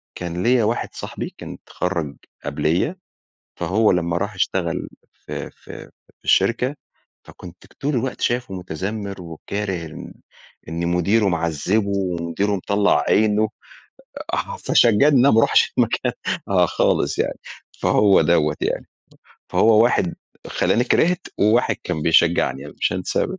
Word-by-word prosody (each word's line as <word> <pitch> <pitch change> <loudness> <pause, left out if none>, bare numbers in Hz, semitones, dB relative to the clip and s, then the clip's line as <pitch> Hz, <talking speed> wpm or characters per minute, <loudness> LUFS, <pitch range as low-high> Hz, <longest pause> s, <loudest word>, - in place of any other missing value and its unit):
كان 90 0 -4
ليَّ 120 -1 +3
واحد 115 +3 -1
صاحبي - - -6
كان - - -8
اتخرج 85 -6 -3 0.3
قبليَّ، 90 - 0 0.6
فهو 110 +3 +2
لمّا 85 -1 0
راح 100 +2 -3
اشتغل 90 -2 -1 0.2
في - - -7
في - - -12 0.3
في - - -45
الشركة 120 +8 +2 0.5
فكُنت 90 -1 -13
ك - - -24
طول 145 +2 -3
الوقت 125 +2 -2
شايفه 120 -4 -1
مُتذمر، 95 +3 -5
وكاره 95 +4 -5
إن 80 - -10 0.6
إن 85 +1 -2
مديره 100 +5 +2
معذِبه، 85 +5 0
ومديره 95 +1 -1
مطلّع 100 -4 +2
عينه، 110 0 +3 0.8
آه - - -2
فشجعني 120 - +4
إن 140 -4 +5
أنا 135 +3 +5
ما 110 - +5
اروحش - - +3
المكان - - +1 0.4
آه 90 -2 +3
خالص - - 0
يعني، - - -1 0.4
فهو 100 -2 +4
دَوَّة 80 -3 +2
يعني. - - -2 0.7
فهو 110 0 +5
واحد 90 -7 +1 0.3
خلّاني 120 - +1
كرهت، 175 +7 +1
وواحد 110 +4 +3
كان 85 -4 -3
بيشجعني، 80 -4 +2
أنا 75 - -12
مش - - +1
هانساه 90 0 -1
ابدًا 190 - -6
100 Hz, 135 wpm, -21 LUFS, 85-110 Hz, 0.8 s, إن